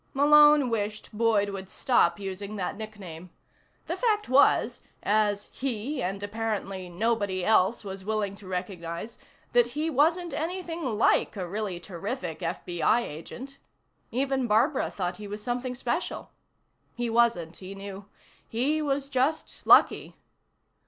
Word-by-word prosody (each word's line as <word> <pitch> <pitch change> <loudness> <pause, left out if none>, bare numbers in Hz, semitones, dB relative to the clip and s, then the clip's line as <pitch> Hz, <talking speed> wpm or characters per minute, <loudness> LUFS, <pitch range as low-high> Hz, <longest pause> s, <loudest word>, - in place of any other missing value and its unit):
Malone 295 -1 +6
wished 210 0 -3
Boyd 210 -2 +2
would 190 -1 -6
stop 195 -10 +2
using 200 +1 -5
that 190 -3 -3
nickname. 195 -6 -8 0.6
The - - -2
fact 430 -4 +1
was 265 +3 +4 0.2
as 205 -1 +1
he, 260 +2 -3
and 195 +1 -3
apparently 205 -3 -3
nobody 200 -1 0
else, 220 +1 +3
was 195 -1 -6
willing 210 -1 -1
to 200 - -13
recognize 180 +2 -5 0.3
that 240 -1 +5
he 320 +2 0
wasn't 330 +4 +2
anything 340 +2 -3
like 215 - +3
a 185 -2 -3
really 200 -1 -3
terrific 180 - -5
FBI 175 +5 0
agent. 245 - -8 0.5
Even 265 0 0
Barbara 245 +7 +2
thought 180 -2 -3
he 210 - -8
was 210 +1 -6
something 250 +1 -2
special. 245 - -3 0.6
He 240 0 -2
wasn't, 225 -8 +2
he 190 +1 -8
knew. 195 0 -8 0.4
He 280 +7 +1
was 275 -2 -1
just 275 +3 -1
lucky. - - +5
215 Hz, 130 wpm, -27 LUFS, 190-260 Hz, 0.6 s, Malone